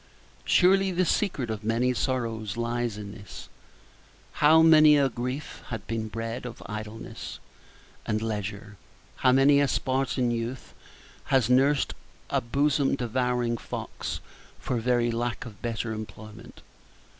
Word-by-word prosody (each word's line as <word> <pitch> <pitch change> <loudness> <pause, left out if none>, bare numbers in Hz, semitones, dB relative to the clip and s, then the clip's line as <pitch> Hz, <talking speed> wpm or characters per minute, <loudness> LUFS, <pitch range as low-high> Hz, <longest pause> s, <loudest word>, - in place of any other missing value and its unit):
Surely 195 +1 +4
the 185 0 +1
secret 150 - 0
of 110 -1 -5
many 115 +3 +1
sorrows 115 -5 -2
lies 120 -2 -2
in 100 -1 -7
this. 100 -3 -11 0.8
How 160 +2 +5
many 155 -2 +7
a 140 -2 +3
grief 125 +4 -5
has 115 -3 -4
been 110 +1 -4
bred 115 +2 -5
of 120 - -10
idleness 105 +1 -7 0.7
and 110 -1 0
leisure! 105 -1 -4 0.4
How 130 - +4
many 135 +2 +5
a 145 - +3
Spartan 130 -2 0
youth 120 +2 -4 0.5
has 130 -3 +2
nursed 135 +2 +3 0.4
a 140 - +2
bosom 140 +3 +1
devouring 125 -1 0
fox - - -5 0.4
for 125 - -2
very 120 0 +1
lack 120 +1 -2
of 110 -4 -11
better 115 -1 -3
employment! 110 0 -10
120 Hz, 130 wpm, -27 LUFS, 110-135 Hz, 0.8 s, many